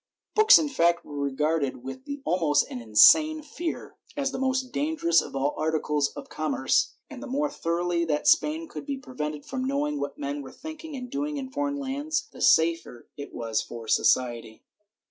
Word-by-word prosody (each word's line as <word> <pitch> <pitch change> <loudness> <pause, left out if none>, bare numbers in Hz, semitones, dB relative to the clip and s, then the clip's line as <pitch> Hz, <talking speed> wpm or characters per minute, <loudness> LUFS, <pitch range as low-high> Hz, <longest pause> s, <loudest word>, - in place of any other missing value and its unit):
^ - - -62
Books 435 0 +8
in 310 - +1
fact 170 -10 +1
were 145 - -9
regarded 140 -1 -1
with 260 - -8 0.2
almost 160 -5 +2
an 125 - -5
insane 310 - +6
fear, 325 +3 -6 0.2
as 275 -1 0
the 260 - -5
most 260 -1 -1
dangerous 280 - +2
of - - -9
all 140 +2 0
articles 155 -2 0
of 145 - -8
commerce, 150 -4 0
and 255 - -10
the 285 - -7
more 285 +3 -1
thoroughly 170 - -1
that 150 -2 -1
Spain 320 +1 +3
could 280 - -9
be 280 -1 -2
prevented 150 - -6
from 260 -1 -4
knowing 290 +2 -1
what - - -4
men 145 0 -4
were 135 -1 -10
thinking 315 -1 -9
and 250 -2 -7
doing 290 +1 -2
in 265 -1 -6
foreign 285 +1 -2
lands, 285 +3 -2
the - - -12
safer 165 -7 +2
it 140 - -8
was 115 -2 -2
for 115 -1 -9
society. 120 -2 +1
175 Hz, 185 wpm, -26 LUFS, -, 0.2 s, Books